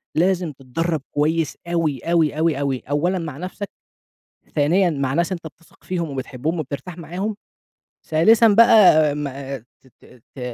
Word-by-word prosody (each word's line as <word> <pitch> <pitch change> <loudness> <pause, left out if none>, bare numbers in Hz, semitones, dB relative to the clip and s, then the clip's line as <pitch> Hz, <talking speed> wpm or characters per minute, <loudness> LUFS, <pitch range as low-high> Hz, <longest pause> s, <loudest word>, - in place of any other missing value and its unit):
لازم 180 0 +1
تتدرّب 150 +4 -3
كويس 155 +2 0
أوي، 165 -6 0
أوي، 165 -3 +1
أوي، 160 -3 +1
أوي، 135 -2 -1
أولًا 175 +6 0
مع 150 -4 -6
نفْسك، 185 +3 -6 0.9
ثانيًا 170 +5 +3
مع 140 -3 -2
ناس 170 +4 0
أنت 170 -3 -5
بتثق 165 +2 -16
فيهم 170 -4 -3
وبتحبهم 135 +5 -3
وبترتاح 155 +5 -6
معاهم، 185 +6 -4 0.7
ثالثًا 220 +9 +5
بقى 200 -9 +6
ما 140 -2 -5
ت 120 +3 -27
ت 125 - -19
ت 135 - -9
160 Hz, 140 wpm, -21 LUFS, 145-175 Hz, 0.9 s, بقى